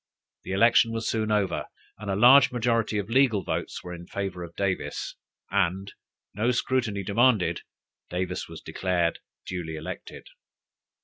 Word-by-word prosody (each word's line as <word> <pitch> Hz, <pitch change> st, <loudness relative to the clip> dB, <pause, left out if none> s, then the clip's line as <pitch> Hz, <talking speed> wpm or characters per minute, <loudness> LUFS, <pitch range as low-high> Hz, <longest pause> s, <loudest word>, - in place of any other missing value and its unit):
The -, -, -4 dB
election 115 Hz, +2 st, +5 dB
was 115 Hz, 0 st, -2 dB
soon 110 Hz, -1 st, 0 dB
over, 100 Hz, -4 st, 0 dB, 0.3 s
and 105 Hz, -1 st, -6 dB
a 95 Hz, -, +1 dB
large 125 Hz, +6 st, +7 dB
majority 115 Hz, -3 st, 0 dB
of 100 Hz, -2 st, -2 dB
legal 120 Hz, -6 st, +3 dB
votes -, -, -4 dB
were 90 Hz, -, -7 dB
in 85 Hz, 0 st, -9 dB
favor 95 Hz, -3 st, -4 dB
of 85 Hz, 0 st, -10 dB
Davis, 100 Hz, -2 st, -2 dB, 0.4 s
and 95 Hz, +3 st, 0 dB, 0.4 s
no 110 Hz, +5 st, 0 dB
scrutiny 125 Hz, -5 st, 0 dB
demanded, 110 Hz, 0 st, +2 dB, 0.5 s
Davis 90 Hz, +1 st, -3 dB
was -, -, -10 dB
declared 90 Hz, -3 st, -1 dB, 0.3 s
duly 85 Hz, -3 st, -5 dB
elected. 80 Hz, 0 st, -8 dB
100 Hz, 140 wpm, -26 LUFS, 90-115 Hz, 0.5 s, large